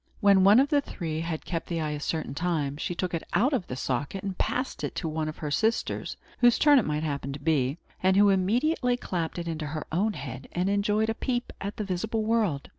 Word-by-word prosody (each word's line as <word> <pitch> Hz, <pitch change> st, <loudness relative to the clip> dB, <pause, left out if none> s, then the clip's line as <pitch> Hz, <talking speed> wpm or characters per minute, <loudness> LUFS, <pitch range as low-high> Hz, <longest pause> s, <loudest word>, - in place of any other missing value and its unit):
When 200 Hz, -2 st, +5 dB
one 205 Hz, +5 st, +7 dB
of 275 Hz, +2 st, +3 dB
the 290 Hz, -2 st, +3 dB
three 160 Hz, -, -4 dB
had 165 Hz, -1 st, -4 dB
kept 165 Hz, -2 st, -3 dB
the 170 Hz, -1 st, -2 dB
eye 155 Hz, -1 st, -1 dB
a 150 Hz, -, -3 dB
certain 155 Hz, -2 st, -3 dB
time, 150 Hz, -3 st, -1 dB
she 175 Hz, -, -3 dB
took 180 Hz, 0 st, -2 dB
it 165 Hz, -, -1 dB
out 265 Hz, +7 st, +3 dB
of 220 Hz, -9 st, -1 dB
the 125 Hz, -, -4 dB
socket 140 Hz, +9 st, -2 dB
and 195 Hz, -2 st, -3 dB
passed 255 Hz, +8 st, -2 dB
it -, -, -3 dB
to 165 Hz, -, -2 dB
one 155 Hz, 0 st, -2 dB
of 155 Hz, -, -8 dB
her 150 Hz, -2 st, -4 dB
sisters, 220 Hz, +9 st, 0 dB, 0.2 s
whose 240 Hz, -1 st, +5 dB
turn 295 Hz, -2 st, +6 dB
it 225 Hz, -, -1 dB
might 150 Hz, 0 st, -1 dB
happen 140 Hz, -2 st, -3 dB
to 140 Hz, -, -7 dB
be, 145 Hz, -2 st, +1 dB, 0.2 s
and 190 Hz, +1 st, +3 dB
who 205 Hz, 0 st, +6 dB
immediately 245 Hz, -, +2 dB
clapped 175 Hz, -9 st, -3 dB
it 170 Hz, -1 st, -4 dB
into 155 Hz, -2 st, -3 dB
her 155 Hz, +1 st, -4 dB
own 205 Hz, +7 st, +1 dB
head, 135 Hz, -4 st, -7 dB
and 180 Hz, +3 st, 0 dB
enjoyed 210 Hz, +2 st, +1 dB
a -, -, -1 dB
peep 245 Hz, +1 st, -2 dB
at 200 Hz, +1 st, -4 dB
the 215 Hz, -, -2 dB
visible 215 Hz, +4 st, -2 dB
world. 215 Hz, -10 st, 0 dB
180 Hz, 240 wpm, -27 LUFS, 155-215 Hz, 0.2 s, one